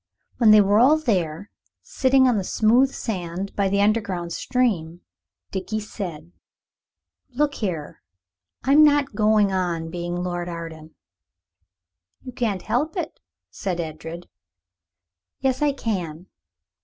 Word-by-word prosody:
When 230 -3 +5
they 215 0 +8
were 205 +1 +3
all 275 +6 +6
there, 195 - -2 0.3
sitting 260 0 +3
on 235 -5 +2
the - - -3
smooth 240 +8 +3
sand 185 -4 -5
by 200 -1 +1
the 200 +1 +1
underground 195 -5 0
stream, 180 -11 -1 0.5
Dickie 195 +3 -3
said 175 -6 -7 1.0
"Look 290 +2 +1
here. 175 - -4 0.6
I'm 280 +4 +6
not 290 -3 +3
going 210 -1 +3
on 170 -3 -2
being 175 0 -4
Lord 175 0 -3
Arden." 165 -2 -8 1.3
"You 255 - -8
can't 225 -7 -2
help 305 - -1
it," 330 -3 -4 0.3
said 180 - -3
Edred. 165 +1 -6 1.1
"Yes, 265 +1 0
I 295 -1 +3
can. 180 - -4
200 Hz, 120 wpm, -23 LUFS, 175-245 Hz, 1.3 s, they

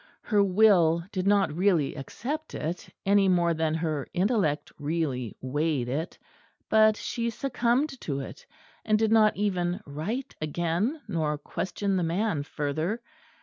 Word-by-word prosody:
Her 205 -3 +3
will 180 -5 +4
did 185 -2 -2
not 200 -6 +3
really 175 -6 +2
accept 280 - -5
it, 175 +4 -4 0.2
any 200 0 +4
more 175 -2 +3
than 160 -1 0
her 155 -4 -2
intellect 185 -6 +1
really 145 -6 -2
weighed 145 -1 -1
it; 150 +7 -3 0.5
but 215 -1 +5
she 235 -1 -2
succumbed 255 +3 0
to 140 -3 -3
it; 135 - -8 0.4
and 215 -1 +3
did 220 0 +1
not 220 -1 +5
even 180 -3 0
write 165 - -4
again, 175 - -1
nor 155 -6 -1
question 190 +6 -2
the 180 - +1
man 170 -1 0
further. 155 +8 -2
180 Hz, 140 wpm, -27 LUFS, 155-215 Hz, 0.5 s, but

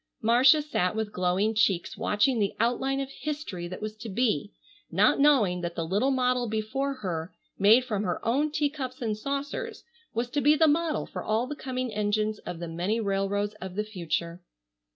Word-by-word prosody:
Marcia 255 +7 +6
sat 185 -10 0
with 220 -1 -2
glowing 185 +3 +1
cheeks 195 -5 +1
watching 230 +4 +1
the 200 -2 0
outline 265 +4 +1
of 275 0 -4
history 285 - -5
that 185 +4 -7
was 215 0 -4
to 220 +1 -8
be, 210 - 0 0.4
not 195 +10 +3
knowing 230 -12 +4
that 170 -1 -4
the 165 - -2
little 205 +10 +1
model 250 -2 +1
before 245 +6 -2
her, 180 -8 -4 0.3
made 220 +6 +6
from 210 -5 -1
her 180 -3 -1
own 280 +6 +2
teacups 285 -4 -2
and 220 -3 -1
saucers, 280 - -4 0.3
was 235 +2 -1
to 285 +4 -1
be 295 +2 +5
the 320 +1 +4
model 315 +1 +1
for - - -6
all 220 +3 +1
the 295 +3 -5
coming 255 -3 -4
engines 210 +1 0
of 175 - -4
the 170 0 -5
many 180 +7 -1
railroads 200 0 -1
of 190 -1 -6
the 210 - 0
future. 170 -4 -3
220 Hz, 185 wpm, -27 LUFS, 195-270 Hz, 0.4 s, Marcia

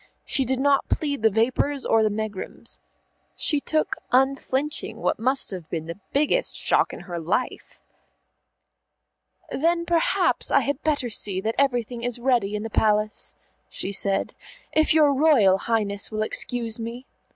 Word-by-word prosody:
She 270 - +1
did 260 +1 -1
not 280 0 +2
plead 285 -5 -1
the 220 - +5
vapours 255 +6 0
or 225 - +3
the 215 - +3
megrims. 210 -2 -6 0.6
She 295 - +1
took 310 +2 -1
unflinching 270 +3 +1
what - - -1
must 260 +2 +1
have 180 -5 -7
been 160 -2 -4
the 170 +4 -7
biggest 300 - +1
shock - - +1
in - - -8
her 175 -2 -6
life. 180 +10 -3 1.7
"Then 335 +3 +1
perhaps 340 -1 +1
I - - +4
had 285 -1 -2
better 290 -6 -1
see 195 -3 -2
that 220 +3 -1
everything 245 -3 0
is 245 0 -2
ready 240 -5 +1
in 210 - -3
the 225 - -6
Palace," 210 0 +1 0.3
she 195 - -5
said, 195 0 0 0.4
"if 315 0 +3
your 300 -2 +5
Royal 260 -10 +4
Highness 205 -3 +1
will 215 0 -1
excuse 230 0 0
me." 235 +3 -6
240 Hz, 150 wpm, -24 LUFS, 210-280 Hz, 1.7 s, the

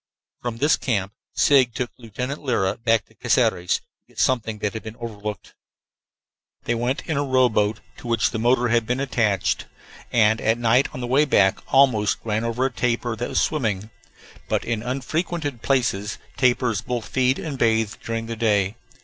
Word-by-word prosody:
From 120 -2 -4
this 145 +6 +3
camp 100 -6 -1 0.2
Sigg 130 -5 +4
took 125 -1 -2
Lieutenant 125 +5 -5
Lyra 115 -8 0
back 115 -3 +2
to - - -25
Caceres 90 0 +1
to - - -19 0.2
get - - -13
something 115 -4 +1
that 105 -1 -2
had 110 - -5
been 110 0 -8
overlooked. 105 -4 -7 1.1
They 120 - 0
went 120 +4 -1
in 160 -4 -1
a 145 - +1
rowboat 120 -6 +2 0.2
to - - -10
which 115 -1 +1
the 110 - -3
motor 120 +1 +2
had 115 -1 +2
been 125 +2 0
attached, 110 -8 0 0.4
and 110 -1 +3
at 110 +1 +2
night 120 +3 +3
on 125 - -7
the - - -2
way 135 +5 +3
back 100 -8 +3
almost 130 -6 +4
ran 110 0 -1
over 115 +3 0
a 135 - 0
tapir 120 -1 -1
that 120 - -3
was - - +1
swimming. 110 -8 -1 0.6
But - - 0
in 115 -2 -1
unfrequented 140 +2 -3
places 115 -6 0 0.2
tapirs 120 -4 +2
both 120 -3 -4
feed 130 0 +2
and 145 -5 -5
bathe 110 -2 +2
during 115 0 -3
the 115 0 -5
day. 105 -2 +1
115 Hz, 175 wpm, -23 LUFS, 110-130 Hz, 1.1 s, Sigg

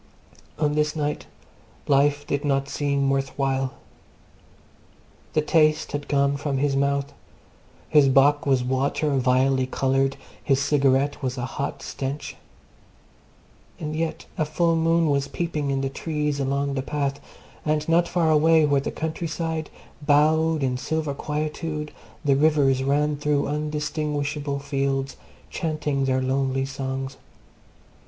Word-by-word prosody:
On 150 -1 +1
this 150 0 0
night 150 -1 -2 0.6
life 145 +1 +3
did 140 0 -2
not 140 -1 +1
seem 140 0 0
worth 135 0 -2
while. 135 -1 0 1.6
The 155 - +2
taste 155 0 +2
had 145 0 -4
gone 140 0 +2
from 140 -1 -2
his 140 0 +1
mouth; 140 +1 0 0.7
his 145 -3 +5
bock 145 +2 +4
was 130 -2 +3
water 135 +4 0
vilely 130 +1 +2
coloured; 135 +1 +1 0.3
his 135 -1 +2
cigarette 140 0 +2
was 130 -1 -2
a 120 - -2
hot 140 +1 -4
stench. 140 +2 -5 1.4
And 155 0 -4
yet 160 0 -3
a - - +3
full 165 +2 +1
moon 165 0 +2
was 140 -1 +1
peeping 155 -4 -2
in 135 0 0
the 135 - 0
trees 150 +1 -2
along 140 +1 0
the 135 - -1
path, 140 0 -2 0.4
and 150 0 0
not 170 +1 +3
far 165 -3 +1
away, 160 +1 +5
where 140 -2 +2
the - - -3
countryside 160 0 -3 0.3
bowed 155 +1 +3
in 125 -1 0
silver 155 +1 -2
quietude, 150 +1 -3 0.3
the 140 -1 +4
rivers 140 -3 +3
ran 145 +2 +1
through 145 0 +1
undistinguishable 150 -1 -2
fields 140 -1 -2 0.4
chanting 155 -5 -1
their 130 0 +1
lonely 135 0 0
songs. 135 0 -4
145 Hz, 130 wpm, -24 LUFS, 135-150 Hz, 1.6 s, his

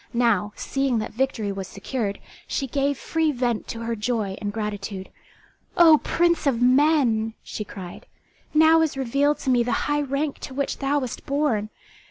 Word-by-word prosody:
Now, 230 -3 +2
seeing 270 -3 -1
that 215 - -3
victory 230 -4 -1
was 195 -1 -5
secured, 200 +1 -3 0.3
she 275 - -1
gave 280 +1 0
free 320 -1 0
vent 240 -4 -1
to 230 - -6
her 230 0 -2
joy 215 -3 -2
and 205 -1 -2
gratitude. 205 -2 -5 0.7
"O 320 -3 +8
prince 340 -3 +1
of 250 -4 +2
men!" 250 -4 +3
she 210 - -5
cried, 185 -3 -10 0.4
"now 315 +1 +6
is 315 -4 0
revealed 275 +3 +1
to 265 - 0
me 245 -1 +4
the 240 +1 0
high 295 0 +1
rank 280 +1 -2
to 260 - -8
which 280 0 -2
thou 275 +1 +1
wast 255 -1 -4
born. 275 -8 0
255 Hz, 170 wpm, -24 LUFS, 220-285 Hz, 0.7 s, O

